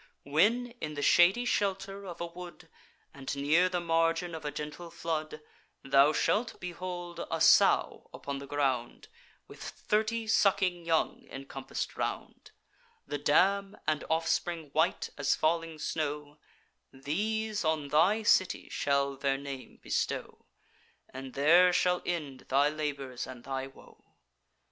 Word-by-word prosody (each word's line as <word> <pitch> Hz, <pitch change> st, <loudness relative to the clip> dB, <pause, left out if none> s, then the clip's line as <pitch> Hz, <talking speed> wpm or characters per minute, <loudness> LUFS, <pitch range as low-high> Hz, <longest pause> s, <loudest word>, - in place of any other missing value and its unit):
When, 215 Hz, -, +2 dB
in 150 Hz, -1 st, -4 dB
the 145 Hz, -, -3 dB
shady 185 Hz, +11 st, +5 dB
shelter 195 Hz, -2 st, -1 dB
of 175 Hz, -, -8 dB
a 170 Hz, -, -2 dB
wood, 170 Hz, -1 st, -10 dB, 0.5 s
And 140 Hz, -2 st, -5 dB
near 155 Hz, +6 st, +3 dB
the 180 Hz, -1 st, -1 dB
margin 165 Hz, +1 st, +1 dB
of 160 Hz, -, -6 dB
a 150 Hz, -, -2 dB
gentle 150 Hz, +3 st, -7 dB
flood, 155 Hz, -2 st, -4 dB, 0.4 s
Thou 135 Hz, +2 st, +5 dB
shalt 220 Hz, +9 st, 0 dB
behold 175 Hz, -1 st, -6 dB
a -, -, -2 dB
sow -, -, +4 dB
upon 140 Hz, -1 st, -6 dB
the 140 Hz, -, -9 dB
ground, 135 Hz, -4 st, -2 dB, 0.4 s
With -, -, -13 dB
thirty 220 Hz, +2 st, -1 dB
sucking 190 Hz, -5 st, +2 dB
young 165 Hz, -1 st, 0 dB
encompass'd 135 Hz, 0 st, -6 dB
round; -, -, -4 dB, 0.6 s
The 145 Hz, -, -4 dB
dam 195 Hz, +7 st, +2 dB
and 155 Hz, -1 st, 0 dB
offspring 165 Hz, -1 st, -1 dB
white 160 Hz, +3 st, +1 dB
as 140 Hz, -1 st, +2 dB
falling 165 Hz, 0 st, 0 dB
snow: 150 Hz, -1 st, -4 dB, 0.5 s
These 210 Hz, +10 st, -2 dB
on 155 Hz, -3 st, 0 dB
thy 180 Hz, +9 st, +3 dB
city 185 Hz, -2 st, +2 dB
shall 140 Hz, -1 st, 0 dB
their 135 Hz, 0 st, 0 dB
name 140 Hz, -1 st, -8 dB
bestow, -, -, -3 dB, 0.7 s
And 130 Hz, 0 st, -8 dB
there 170 Hz, +6 st, +6 dB
shall 180 Hz, 0 st, +2 dB
end 150 Hz, -7 st, -4 dB
thy 140 Hz, +2 st, +4 dB
labours 140 Hz, -4 st, -4 dB
and 125 Hz, -2 st, -10 dB
thy 135 Hz, 0 st, -4 dB
woe. 135 Hz, -, -18 dB
160 Hz, 135 wpm, -30 LUFS, 140-180 Hz, 0.7 s, there